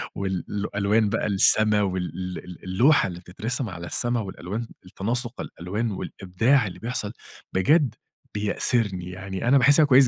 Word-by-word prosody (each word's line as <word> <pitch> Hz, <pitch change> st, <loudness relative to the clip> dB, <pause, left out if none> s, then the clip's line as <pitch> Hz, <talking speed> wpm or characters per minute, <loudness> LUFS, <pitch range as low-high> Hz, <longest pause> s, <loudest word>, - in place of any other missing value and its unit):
وال 95 Hz, -3 st, -2 dB
ال 105 Hz, 0 st, -3 dB
الألوان 105 Hz, +2 st, +1 dB
بقى 115 Hz, -, -1 dB
السما 105 Hz, +1 st, +5 dB
وال 90 Hz, -1 st, -3 dB
ال 90 Hz, -2 st, -11 dB
اللوحة 120 Hz, +9 st, +3 dB
اللي 90 Hz, -2 st, -7 dB
بتترسم 110 Hz, +7 st, -4 dB
على 85 Hz, -2 st, -7 dB
السما 120 Hz, +4 st, +1 dB
والألوان 105 Hz, +3 st, -5 dB, 0.2 s
التناسق 120 Hz, +6 st, -3 dB
الألوان 105 Hz, +7 st, -4 dB
والإبداع 105 Hz, +6 st, 0 dB
اللي 90 Hz, -, -9 dB
بيحصل 115 Hz, -3 st, -3 dB, 0.4 s
بجد 135 Hz, -, +3 dB, 0.4 s
بيأسرني 105 Hz, -3 st, 0 dB
يعني 95 Hz, +3 st, -5 dB
أنا 135 Hz, +3 st, +6 dB
باحسها 145 Hz, +4 st, +6 dB
كويس 135 Hz, -1 st, +6 dB
105 Hz, 145 wpm, -24 LUFS, 95-120 Hz, 0.4 s, أنا